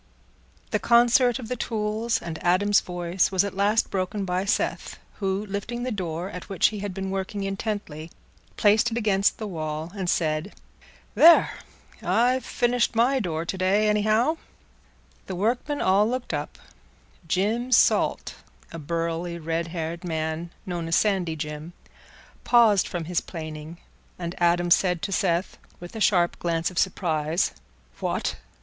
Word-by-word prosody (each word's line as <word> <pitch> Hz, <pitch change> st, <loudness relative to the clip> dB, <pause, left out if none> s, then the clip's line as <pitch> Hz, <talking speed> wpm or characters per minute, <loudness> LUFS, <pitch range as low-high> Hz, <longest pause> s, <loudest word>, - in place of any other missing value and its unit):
The -, -, +1 dB
concert 240 Hz, +1 st, +4 dB
of 250 Hz, -4 st, -7 dB
the 250 Hz, -, -2 dB
tools 220 Hz, 0 st, -1 dB
and 165 Hz, -2 st, -7 dB
Adam's 195 Hz, +3 st, +4 dB
voice 175 Hz, +1 st, -1 dB
was 190 Hz, -1 st, +3 dB
at 200 Hz, -, -4 dB
last 205 Hz, +4 st, +1 dB
broken 195 Hz, +1 st, -2 dB
by 180 Hz, +1 st, -1 dB
Seth, 200 Hz, -, -1 dB, 0.2 s
who, 195 Hz, 0 st, -1 dB
lifting 210 Hz, +4 st, -4 dB
the 255 Hz, -, -2 dB
door 180 Hz, -2 st, -4 dB
at 180 Hz, -, -8 dB
which 195 Hz, -3 st, +3 dB
he 210 Hz, -, -6 dB
had 200 Hz, 0 st, -4 dB
been 190 Hz, 0 st, -4 dB
working 195 Hz, +1 st, -3 dB
intently, 195 Hz, -6 st, -4 dB, 0.5 s
placed 215 Hz, +3 st, +4 dB
it 230 Hz, -, -3 dB
against 205 Hz, -3 st, +2 dB
the 220 Hz, -, -5 dB
wall, 160 Hz, -3 st, -4 dB
and 190 Hz, -3 st, -2 dB
said, 155 Hz, +3 st, -1 dB, 0.6 s
"There! 335 Hz, +1 st, +7 dB, 0.5 s
I've 250 Hz, +2 st, +2 dB
finished 245 Hz, -1 st, 0 dB
my 250 Hz, +4 st, +3 dB
door 165 Hz, -6 st, -2 dB
to 185 Hz, -, -3 dB
day, 200 Hz, +3 st, +2 dB
anyhow." 215 Hz, +8 st, +2 dB, 0.9 s
The 190 Hz, -, -4 dB
workmen 240 Hz, +9 st, -1 dB
all 200 Hz, +3 st, +3 dB
looked 250 Hz, -6 st, -3 dB
up; 145 Hz, 0 st, -4 dB, 0.7 s
Jim 220 Hz, +9 st, 0 dB
Salt, 245 Hz, -, +3 dB, 0.4 s
a 165 Hz, -, -7 dB
burly, 170 Hz, +2 st, -3 dB
red 165 Hz, +1 st, -2 dB
haired 165 Hz, 0 st, -5 dB
man 160 Hz, 0 st, -3 dB, 0.2 s
known 175 Hz, -3 st, -4 dB
as 165 Hz, -, +1 dB
Sandy 190 Hz, -6 st, +1 dB
Jim, 150 Hz, +2 st, -6 dB, 0.7 s
paused 225 Hz, -5 st, +4 dB
from 175 Hz, -3 st, -4 dB
his 175 Hz, +1 st, -1 dB
planing, 155 Hz, -1 st, -8 dB, 0.4 s
and 170 Hz, -1 st, -4 dB
Adam 175 Hz, 0 st, +2 dB
said 180 Hz, -1 st, +3 dB
to 200 Hz, -, -2 dB
Seth, 180 Hz, -1 st, 0 dB, 0.2 s
with 175 Hz, +5 st, -10 dB
a 220 Hz, -, -5 dB
sharp 175 Hz, -4 st, +2 dB
glance 165 Hz, 0 st, -1 dB
of 180 Hz, -, -2 dB
surprise, 165 Hz, -3 st, 0 dB, 0.5 s
"What! -, -, -2 dB
190 Hz, 150 wpm, -25 LUFS, 170-215 Hz, 0.9 s, There